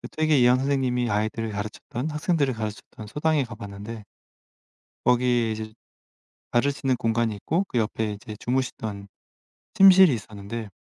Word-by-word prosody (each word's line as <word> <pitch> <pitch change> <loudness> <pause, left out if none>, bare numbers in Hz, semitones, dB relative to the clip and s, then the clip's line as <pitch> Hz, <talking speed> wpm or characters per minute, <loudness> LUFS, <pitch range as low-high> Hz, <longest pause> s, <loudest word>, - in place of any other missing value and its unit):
그 - - -8
퇴계 155 -2 +2
이황 125 +1 +5
선생님이 130 -3 0
아이들을 110 +2 -1
가르쳤던 110 +7 -5
학생들을 150 -3 0
가르쳤던 110 0 -7
서당에 150 +4 +1
가 115 - -9
봤는데 105 +1 -8 1.0
거기에 120 -2 +3
이제 110 0 -5 0.8
봐 120 - +3
줄 140 +2 +1
수 145 - -11
있는 130 -1 +3
공간이 115 -2 0
있고 165 - -1
그 125 - -3
옆에 110 0 -1
이제 105 +1 -9
주무시던 110 -5 -3 0.7
침실이 190 -5 +8
있었는데 105 +1 -7
120 Hz, 350 characters per minute, -25 LUFS, 110-135 Hz, 1.0 s, 침실이